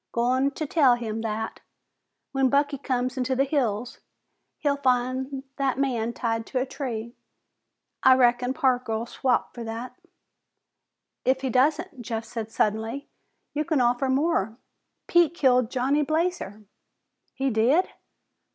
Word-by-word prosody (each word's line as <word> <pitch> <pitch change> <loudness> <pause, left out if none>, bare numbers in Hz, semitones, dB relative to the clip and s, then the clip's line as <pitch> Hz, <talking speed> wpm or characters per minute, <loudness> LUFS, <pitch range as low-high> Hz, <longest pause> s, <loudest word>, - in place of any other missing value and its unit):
Goin' 255 +3 +2
to 310 - -2
tell 280 -5 +4
him 225 -2 -4
that, 220 0 -3 0.7
when 270 -1 +2
Bucky 285 +1 +1
comes 255 -1 -1
into 260 +1 0
the 270 - +3
hills, 245 -5 -1 0.6
he'll 285 -1 0
find 260 +1 0
that 270 -2 0
man 240 -4 0
tied 225 -1 -2
to - - -3
a 255 - 0
tree. 235 -4 -5 0.9
I 260 0 +7
reckon 250 0 +3
Parker'll 245 -4 +1
swap 250 +1 0
for 240 - -7
that." 230 +2 -6 1.3
"If 265 +1 +2
he 265 -2 -1
doesn't," 295 +3 +1
Jeff 225 -1 -4
said 225 -2 -5
suddenly, 225 +7 -1 0.4
"you 300 - 0
can 310 -2 0
offer 245 +2 +2
more. 260 - +1 0.5
Pete 345 -2 +3
killed 250 -6 +3
Johnny 265 +4 +1
Blazer!" 310 - -1 0.7
"He 270 0 0
did?" 245 +11 +3
255 Hz, 135 wpm, -26 LUFS, 235-275 Hz, 1.3 s, I